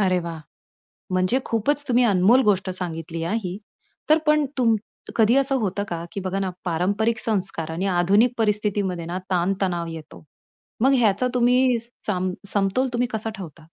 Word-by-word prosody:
अरे 185 Hz, -2 st, +2 dB
वाह! 165 Hz, -1 st, -6 dB, 0.7 s
म्हणजे 185 Hz, +8 st, +1 dB
खूपच 280 Hz, +6 st, 0 dB
तुम्ही 245 Hz, 0 st, +3 dB
अनमोल 200 Hz, +8 st, +4 dB
गोष्ट 190 Hz, -2 st, +1 dB
सांगितली 165 Hz, -3 st, -5 dB
हां, 185 Hz, +7 st, -2 dB
ही. 180 Hz, +1 st, -5 dB, 0.5 s
तर 310 Hz, -, +6 dB
पण 300 Hz, -1 st, +3 dB
तूम 230 Hz, -3 st, +3 dB, 0.4 s
कधी 225 Hz, +2 st, +3 dB
असं 275 Hz, 0 st, +5 dB
होतं 200 Hz, 0 st, -2 dB
का 170 Hz, -1 st, -4 dB
की 200 Hz, -, -5 dB
बघा 190 Hz, +1 st, -2 dB
ना 190 Hz, -1 st, -2 dB, 0.2 s
पारंपरिक 200 Hz, +7 st, 0 dB
संस्कार 190 Hz, -8 st, 0 dB
आणि 175 Hz, +4 st, -3 dB
आधुनिक 205 Hz, +8 st, +3 dB
परिस्थितीमध्ये 205 Hz, -5 st, 0 dB
ना 175 Hz, +2 st, -4 dB
ताण-तणाव 180 Hz, -1 st, -1 dB
येतो. 160 Hz, -1 st, -10 dB, 0.6 s
मग 270 Hz, +2 st, +4 dB
ह्याचा 220 Hz, +1 st, +2 dB
तुम्ही 250 Hz, 0 st, +3 dB, 0.3 s
साम 185 Hz, -2 st, -1 dB, 0.2 s
समतोल 200 Hz, +6 st, +1 dB
तुम्ही 245 Hz, +1 st, 0 dB
कसा 220 Hz, 0 st, -3 dB
ठेवता? 160 Hz, -4 st, -10 dB
195 Hz, 155 wpm, -22 LUFS, 180-235 Hz, 0.7 s, तर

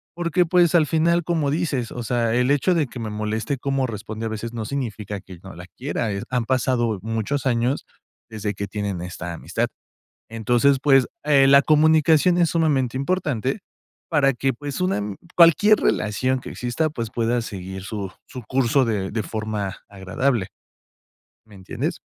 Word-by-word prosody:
porque, 175 Hz, 0 st, +1 dB
pues, 175 Hz, 0 st, +3 dB
al 155 Hz, -4 st, +4 dB
final, 170 Hz, +1 st, +2 dB
como 155 Hz, -4 st, 0 dB
dices, 145 Hz, -7 st, -1 dB
o 125 Hz, -, -5 dB
sea, 115 Hz, 0 st, 0 dB
el 125 Hz, +2 st, +2 dB
hecho 145 Hz, +6 st, +2 dB
de 155 Hz, -5 st, +1 dB
que 125 Hz, -, -10 dB
me 110 Hz, -1 st, -4 dB
moleste 110 Hz, +5 st, -2 dB
cómo 135 Hz, -1 st, 0 dB
responde 110 Hz, 0 st, -6 dB
a -, -, -3 dB
veces 110 Hz, +2 st, -5 dB
no 115 Hz, -2 st, -4 dB
significa 105 Hz, -7 st, -4 dB
que 95 Hz, -3 st, -12 dB
no 95 Hz, -, -10 dB
la 85 Hz, +1 st, -10 dB
quiera, 125 Hz, -5 st, -2 dB
eh, 100 Hz, 0 st, -3 dB
han 125 Hz, -2 st, 0 dB
pasado 120 Hz, -3 st, +1 dB
muchos 115 Hz, +6 st, -2 dB
años 125 Hz, +1 st, 0 dB, 0.4 s
desde 105 Hz, -2 st, -4 dB
que 100 Hz, -, -3 dB
tienen 100 Hz, -2 st, -4 dB
esta 85 Hz, -1 st, -6 dB
amistad. 85 Hz, -, -2 dB, 0.6 s
Entonces, 120 Hz, +5 st, +2 dB
pues, 135 Hz, -3 st, +4 dB, 0.2 s
eh, 140 Hz, -2 st, +5 dB
la 140 Hz, +1 st, +7 dB
comunicación 160 Hz, +3 st, +4 dB
es 170 Hz, -2 st, +3 dB
sumamente 140 Hz, -7 st, +1 dB
importante 140 Hz, -, -1 dB, 0.5 s
para 140 Hz, -4 st, +3 dB
que, 135 Hz, +2 st, 0 dB
pues, 145 Hz, +5 st, -6 dB
una 185 Hz, -, +1 dB
ami 105 Hz, -1 st, -4 dB, 0.2 s
cualquier 190 Hz, +5 st, +6 dB
relación 130 Hz, +5 st, 0 dB
que -, -, -8 dB
exista, 125 Hz, +6 st, -1 dB
pues, 115 Hz, -7 st, -5 dB
pueda 120 Hz, +1 st, 0 dB
seguir 95 Hz, -3 st, -7 dB
su 100 Hz, -1 st, -5 dB, 0.2 s
su 125 Hz, -3 st, -8 dB
curso 130 Hz, +3 st, +2 dB
de 100 Hz, -4 st, -1 dB
de 110 Hz, -1 st, -2 dB
forma 110 Hz, -3 st, -4 dB
agradable. 100 Hz, +3 st, -1 dB, 1.0 s
¿Me 105 Hz, -2 st, -16 dB
entiendes? 95 Hz, -1 st, -4 dB
120 Hz, 170 wpm, -22 LUFS, 105-145 Hz, 1.0 s, la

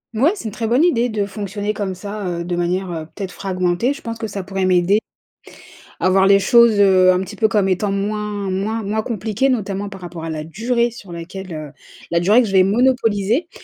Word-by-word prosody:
Ouais, 280 Hz, +10 st, +4 dB
c'est 400 Hz, -, -9 dB
une 220 Hz, -, -3 dB
très 225 Hz, +2 st, -4 dB
bonne 245 Hz, +8 st, +3 dB
idée 245 Hz, -9 st, +3 dB
de 205 Hz, -2 st, -1 dB
fonctionner 205 Hz, +1 st, -4 dB
comme 195 Hz, -3 st, -3 dB
ça, 205 Hz, +2 st, -6 dB
heu, 170 Hz, -1 st, -3 dB
de 175 Hz, 0 st, -3 dB
manière, 180 Hz, +2 st, -1 dB
heu, 160 Hz, -2 st, -5 dB
peut-être 195 Hz, -3 st, -5 dB
fragmentée. 185 Hz, +7 st, -1 dB
Je 315 Hz, -, -12 dB
pense 230 Hz, 0 st, -5 dB
que 225 Hz, -, -4 dB
ça 200 Hz, -2 st, -5 dB
pourrait 190 Hz, 0 st, -2 dB
m'aider 185 Hz, +2 st, +3 dB, 1.0 s
à 185 Hz, -, +2 dB
voir 190 Hz, 0 st, +4 dB
les 195 Hz, 0 st, +6 dB
choses, 235 Hz, 0 st, +5 dB
heu, 185 Hz, -2 st, +5 dB
un 180 Hz, -, +1 dB
petit 190 Hz, -, -6 dB
peu 220 Hz, -, +2 dB
comme 205 Hz, -3 st, +1 dB
étant 195 Hz, +2 st, 0 dB
moins 205 Hz, 0 st, -2 dB
moins 210 Hz, +4 st, -2 dB
moins 210 Hz, +2 st, -1 dB
compliquées. 220 Hz, +3 st, -1 dB
Notamment 205 Hz, -5 st, -2 dB
par 195 Hz, -2 st, -11 dB
rapport 170 Hz, -2 st, -7 dB
à 165 Hz, -, -4 dB
la 155 Hz, -1 st, -4 dB
durée 235 Hz, +8 st, 0 dB
sur 210 Hz, -5 st, -12 dB
laquelle, 175 Hz, +2 st, -7 dB
heu, 155 Hz, -2 st, -7 dB, 0.4 s
la 170 Hz, -, +2 dB
durée 210 Hz, +8 st, +5 dB
que 230 Hz, -, -2 dB
je 195 Hz, -, -5 dB
vais 185 Hz, -1 st, +5 dB
monopoliser. 230 Hz, -, +1 dB
200 Hz, 225 wpm, -19 LUFS, 185-220 Hz, 1.0 s, les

